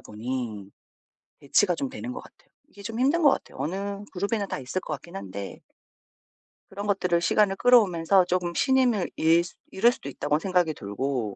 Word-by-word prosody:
보니 110 Hz, -3 st, -5 dB, 0.7 s
대치가 175 Hz, +6 st, +2 dB
좀 270 Hz, +9 st, -3 dB
되는 250 Hz, -1 st, -6 dB
것 -, -, -7 dB
같아요. -, -, -20 dB, 0.2 s
이게 200 Hz, -, -14 dB
좀 225 Hz, +3 st, -5 dB
힘든 290 Hz, +7 st, +2 dB
것 290 Hz, -, +7 dB
같아요. -, -, -4 dB
어느 200 Hz, +4 st, -3 dB
그룹이나 200 Hz, +2 st, -1 dB
다 -, -, -4 dB
있을 130 Hz, +8 st, -3 dB
것 155 Hz, -, -5 dB
같긴 170 Hz, +4 st, -9 dB
한데 100 Hz, 0 st, -7 dB, 1.1 s
그런 200 Hz, +1 st, -6 dB
것들을 180 Hz, -4 st, +1 dB
시간을 195 Hz, +3 st, +2 dB
끌어오면서 195 Hz, -7 st, +4 dB
조금 175 Hz, -1 st, -1 dB
신임을 255 Hz, -7 st, +2 dB
잃 165 Hz, +2 st, +4 dB
수 175 Hz, -, -11 dB, 0.2 s
잃을 230 Hz, +5 st, +4 dB
수도 195 Hz, -, -9 dB
있다고 145 Hz, +2 st, -1 dB
생각이 180 Hz, -3 st, +1 dB
들고 115 Hz, -1 st, -3 dB
180 Hz, 355 characters per minute, -26 LUFS, 140-205 Hz, 1.1 s, 것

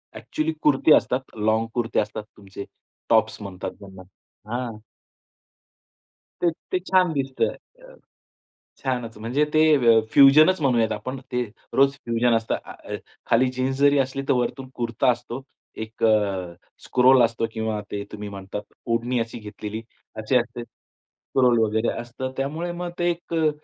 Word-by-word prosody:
Actually 155 Hz, +1 st, -2 dB
kurti 150 Hz, +1 st, +5 dB
असतात, 125 Hz, -, +3 dB, 0.3 s
long 110 Hz, +1 st, +2 dB
कुर्ते 120 Hz, -2 st, 0 dB
असतात. 105 Hz, 0 st, -3 dB
तुमचे 100 Hz, 0 st, -9 dB, 0.4 s
टॉप्स -, -, +2 dB
म्हणतात 95 Hz, -1 st, -6 dB
त्यांना 95 Hz, -2 st, -12 dB, 0.5 s
हां. 120 Hz, -3 st, -3 dB, 1.6 s
तर 170 Hz, -1 st, +3 dB, 0.2 s
ते 185 Hz, -, +1 dB
छान 185 Hz, -1 st, +2 dB
दिसतं, 135 Hz, -2 st, -1 dB, 0.3 s
अ, -, -, -14 dB, 0.8 s
छानच. 125 Hz, -4 st, -3 dB
म्हणजे 125 Hz, +7 st, +1 dB
ते 155 Hz, -, +5 dB, 0.2 s
व 115 Hz, -3 st, +5 dB
फ्युजनच 155 Hz, +6 st, +7 dB
म्हणूयात 120 Hz, -5 st, +2 dB
आपण, 130 Hz, +6 st, -5 dB
ते 125 Hz, 0 st, +1 dB, 0.3 s
रोज 135 Hz, 0 st, +4 dB
फ्युजन 120 Hz, -2 st, 0 dB
असतं. 115 Hz, 0 st, -1 dB
अ, -, -, -8 dB, 0.3 s
खाली 125 Hz, +3 st, +3 dB
जीन्स 130 Hz, +1 st, 0 dB
जरी 145 Hz, 0 st, +5 dB
असली, 135 Hz, +1 st, -1 dB
तर -, -, +5 dB
वरतून 130 Hz, +1 st, -2 dB
कुर्ता 120 Hz, +2 st, +1 dB
असतो, 120 Hz, +2 st, -4 dB, 0.4 s
एक 110 Hz, +1 st, -5 dB
अ, 100 Hz, -5 st, +1 dB, 0.3 s
स्टोल 130 Hz, 0 st, +5 dB
असतो 115 Hz, 0 st, 0 dB
किंवा 110 Hz, -1 st, -2 dB
ते 100 Hz, 0 st, -4 dB
तुम्ही 105 Hz, -1 st, -6 dB
म्हणतात 100 Hz, +1 st, -6 dB, 0.3 s
ओढणी 120 Hz, +2 st, 0 dB
अशी 115 Hz, +1 st, -4 dB
घेतलेली 105 Hz, +1 st, -7 dB, 0.4 s
अशी 120 Hz, +4 st, +1 dB
असते. 120 Hz, 0 st, -4 dB
स्टोल 125 Hz, -1 st, -2 dB
वगैरे 110 Hz, +1 st, +1 dB
असतं. 120 Hz, +2 st, -5 dB
तर -, -, -10 dB
त्यामुळे 155 Hz, +6 st, -2 dB
मग 175 Hz, 0 st, -4 dB
ते 175 Hz, 0 st, +2 dB
एक 170 Hz, 0 st, -5 dB
अ, 160 Hz, -2 st, +3 dB
120 Hz, 145 wpm, -24 LUFS, 110-135 Hz, 1.6 s, फ्युजनच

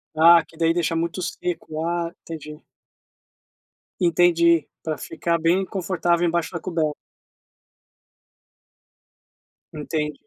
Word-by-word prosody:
Ah, 165 Hz, +1 st, +7 dB
que 160 Hz, -, -20 dB
daí 165 Hz, 0 st, +2 dB
deixa 170 Hz, -1 st, 0 dB
muito 170 Hz, +2 st, -2 dB
seco. 165 Hz, -3 st, -4 dB
Ah, 170 Hz, 0 st, -1 dB
entendi. 150 Hz, -2 st, -8 dB, 1.4 s
Entendi, 170 Hz, -2 st, +4 dB, 0.2 s
pra 155 Hz, -1 st, -3 dB
ficar 170 Hz, -1 st, -2 dB
bem 175 Hz, +4 st, +2 dB
confortável 175 Hz, -2 st, 0 dB
embaixo 170 Hz, +1 st, -1 dB
da 170 Hz, -, -3 dB
coberta. 160 Hz, -4 st, -1 dB, 2.8 s
Entendi. 150 Hz, 0 st, -3 dB
170 Hz, 100 wpm, -23 LUFS, 160-175 Hz, 2.8 s, Ah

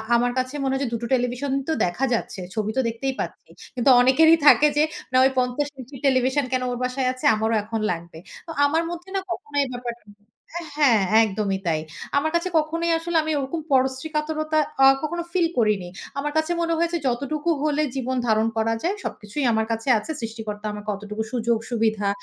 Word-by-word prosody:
আমার 245 Hz, +1 st, +2 dB
কাছে 255 Hz, +1 st, -1 dB
মনে 265 Hz, 0 st, 0 dB
হয় 270 Hz, -, 0 dB
যে 255 Hz, -, -1 dB
দুটো 235 Hz, 0 st, -3 dB
টেলিভিশন 250 Hz, +2 st, 0 dB, 0.2 s
তো 320 Hz, -, +1 dB
দেখা 180 Hz, +10 st, -1 dB
যাচ্ছে, 220 Hz, -4 st, -3 dB
ছবি 215 Hz, -1 st, -1 dB
তো -, -, +4 dB
দেখতেই 235 Hz, +4 st, -2 dB
পাচ্ছি। -, -, -6 dB, 0.3 s
কিন্তু 250 Hz, +1 st, +2 dB
অনেকেরই 320 Hz, +6 st, +6 dB
থাকে 300 Hz, -, +8 dB
যে, 300 Hz, -, +5 dB, 0.3 s
"না, 255 Hz, -, +3 dB
ওই 265 Hz, -, +4 dB
৫০ 250 Hz, +3 st, 0 dB
ইঞ্চির 260 Hz, +1 st, -10 dB
টেলিভিশন 260 Hz, +1 st, +2 dB
কেন 255 Hz, -1 st, +1 dB
ওর 245 Hz, -, -3 dB
বাসায় 255 Hz, +1 st, -1 dB
আছে? 255 Hz, -, -8 dB
আমারও 220 Hz, +1 st, 0 dB
এখন 220 Hz, +1 st, -3 dB
লাগবে।" 170 Hz, -1 st, -7 dB, 0.3 s
তো -, -, -6 dB
আমার 320 Hz, +4 st, +1 dB
মধ্যে 345 Hz, +2 st, -7 dB
না -, -, +2 dB
কখনো 290 Hz, -4 st, -5 dB, 0.2 s
ব্যাপারটা 240 Hz, -1 st, -6 dB, 0.6 s
আ -, -, -6 dB, 0.2 s
হ্যাঁ, 255 Hz, -8 st, +5 dB, 0.2 s
একদমই 195 Hz, -2 st, -1 dB
তাই। 160 Hz, -2 st, +1 dB, 0.4 s
আমার 310 Hz, +2 st, +1 dB
কাছে 340 Hz, +2 st, 0 dB
কখনোই 330 Hz, +2 st, -1 dB
আসলে 335 Hz, 0 st, -1 dB
আমি 315 Hz, -, -2 dB
ওরকম 280 Hz, +4 st, -3 dB
পরশ্রীকাতরতা 305 Hz, +4 st, 0 dB, 0.2 s
আ -, -, +9 dB, 0.2 s
কখনো 345 Hz, +2 st, -2 dB
ফিল 350 Hz, -2 st, +2 dB
করিনি। 210 Hz, -6 st, +1 dB, 0.3 s
আমার 295 Hz, +1 st, -2 dB
কাছে 315 Hz, +2 st, +1 dB
মনে 335 Hz, 0 st, 0 dB
হয়েছে 340 Hz, +1 st, 0 dB
যতটুকু 285 Hz, +6 st, -1 dB
হলে 305 Hz, 0 st, +1 dB
জীবন 260 Hz, -1 st, -2 dB
ধারণ 220 Hz, 0 st, +3 dB
করা 225 Hz, +1 st, +1 dB
যায়, 370 Hz, +4 st, 0 dB
সবকিছুই 230 Hz, +6 st, -4 dB
আমার 220 Hz, -1 st, +1 dB
কাছে 225 Hz, +3 st, -2 dB
আছে। 215 Hz, +9 st, -5 dB
সৃষ্টিকর্তা 220 Hz, -2 st, -6 dB
আমার 210 Hz, 0 st, -7 dB
অতটুকু 210 Hz, +2 st, -5 dB
সুযোগ 235 Hz, -2 st, +1 dB
সুবিধা, 220 Hz, -4 st, 0 dB
255 Hz, 190 wpm, -23 LUFS, 225-305 Hz, 0.6 s, আ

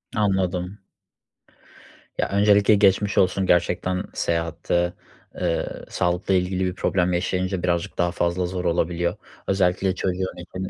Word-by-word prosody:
Anladım. 95 Hz, -2 st, 0 dB, 1.4 s
Ya, -, -, 0 dB
öncelikle 100 Hz, +1 st, +4 dB
geçmiş 100 Hz, +1 st, +3 dB
olsun 95 Hz, +1 st, +3 dB
gerçekten. 90 Hz, +1 st, +1 dB
Seyahatte, 85 Hz, +1 st, -1 dB, 0.4 s
eee, -, -, -1 dB, 0.2 s
sağlıkla 90 Hz, +2 st, 0 dB
ilgili 95 Hz, 0 st, +1 dB
bir 90 Hz, 0 st, -2 dB
problem 90 Hz, -1 st, +1 dB
yaşayınca 90 Hz, +1 st, -1 dB
birazcık 85 Hz, -1 st, -1 dB
daha 85 Hz, 0 st, +1 dB
fazla 85 Hz, +1 st, 0 dB
zor 90 Hz, 0 st, -4 dB
olabiliyor. 85 Hz, 0 st, 0 dB, 0.3 s
Özellikle 95 Hz, -1 st, +1 dB
çocuğun 95 Hz, 0 st, -2 dB
için 95 Hz, +2 st, -6 dB
90 Hz, 120 wpm, -23 LUFS, 90-95 Hz, 1.4 s, öncelikle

